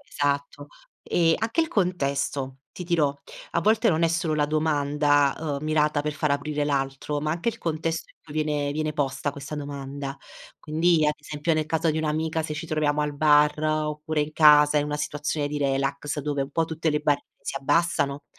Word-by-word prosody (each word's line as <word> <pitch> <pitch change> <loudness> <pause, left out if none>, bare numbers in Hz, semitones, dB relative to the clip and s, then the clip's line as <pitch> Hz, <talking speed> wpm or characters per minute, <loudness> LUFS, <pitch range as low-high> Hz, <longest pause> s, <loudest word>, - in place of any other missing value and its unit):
Esatto. 145 0 -2 0.4
E 165 -2 +2
anche 225 +8 0
il 320 - -3
contesto, 140 -7 -1
ti 180 - -7
dirò, 160 -5 +2 0.4
a 170 - +1
volte 220 +3 +3
non 160 -1 +2
è 165 - +4
solo 165 -1 0
la 150 - +2
domanda, 145 -2 +2
uhm, 150 -3 -3
mirata 150 -1 +1
per 150 0 -2
far 150 -1 -1
aprire 145 +1 -1
l'altro, 140 +1 -2
ma 155 +1 -1
anche 170 +8 -1
il - - -3
contesto 165 0 -3
in - - -62
cui 150 - -12
viene 150 -2 0
viene 155 0 -2
posta 140 0 -2
questa 140 +1 -7
domanda. 140 -1 -6 0.4
Quindi, 160 0 +2
ad 150 - +2
esempio, 150 +2 -2
nel 155 -1 0
caso 160 +1 +1
di 155 - -2
un'amica, 160 +1 -1
se 155 - -4
ci 155 +2 -5
troviamo 150 -1 0
al 150 -1 -1
bar, 150 0 +4
oppure 155 0 -1
in 150 +1 -2
casa 150 -1 +6
in 145 - +1
una 150 0 -2
situazione 150 0 -2
di 150 - -3
relax 140 +1 -1
dove 145 -1 -1
un 135 - -6
po' 165 +2 +1
tutte 160 0 -1
le 150 - +1
barriere 145 -1 0 0.2
si - - -4
abbassano, 140 -1 +1
150 Hz, 195 wpm, -25 LUFS, 145-155 Hz, 0.4 s, casa